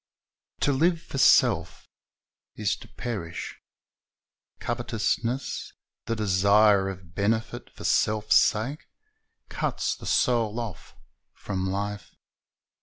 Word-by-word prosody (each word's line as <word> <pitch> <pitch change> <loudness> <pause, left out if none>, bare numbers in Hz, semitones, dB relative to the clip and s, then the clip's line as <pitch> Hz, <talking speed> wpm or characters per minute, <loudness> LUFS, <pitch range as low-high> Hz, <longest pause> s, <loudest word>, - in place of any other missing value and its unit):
To 145 - +3
live 165 +5 +2
for 140 -4 -6
self 130 - +3 0.7
is 105 -2 0
to - - -13
perish. 95 -9 -6 1.0
Covetousness, 120 +3 -2 0.3
the 115 - 0
desire 100 0 +4
of 90 -3 -10
benefit 110 +2 -1
for - - -12
self's 105 0 +3
sake, 130 +9 +1 0.6
cuts - - -2
the - - -10
soul 115 -2 +1
off 110 -8 -7 0.4
from 95 -2 -3
life. 100 +1 -4
105 Hz, 100 wpm, -26 LUFS, 100-120 Hz, 1.0 s, desire